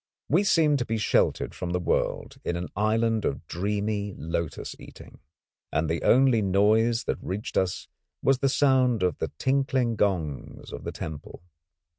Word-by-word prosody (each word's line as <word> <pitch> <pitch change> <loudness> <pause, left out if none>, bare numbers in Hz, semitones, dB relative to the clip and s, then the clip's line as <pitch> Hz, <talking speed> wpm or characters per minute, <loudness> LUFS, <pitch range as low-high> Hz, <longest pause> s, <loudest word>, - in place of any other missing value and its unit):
We 170 +8 +4
seemed 155 -7 +3
to 120 - -1
be 115 - -1
sheltered 105 - +1
from 90 -1 -4
the 90 - +1
world 90 - -1
in 85 - -2
an 85 +1 -4
island 110 +2 +1
of 70 - -2
dreamy 100 +2 -2
lotus 80 0 -4
eating; - - -13 0.5
and 80 +1 0
the 80 +1 -1
only 130 -3 +4
noise 110 +4 +3
that - - -3
reached 100 +4 -5
us 90 -1 0 0.3
was 135 -1 +2
the 135 - +2
sound 130 -6 +3
of 90 -4 0
the - - -3
tinkling 130 -3 +1
gongs 85 -9 -2
of - - -8
the - - -3
temple. 80 +1 -8
105 Hz, 160 wpm, -26 LUFS, 90-125 Hz, 0.5 s, We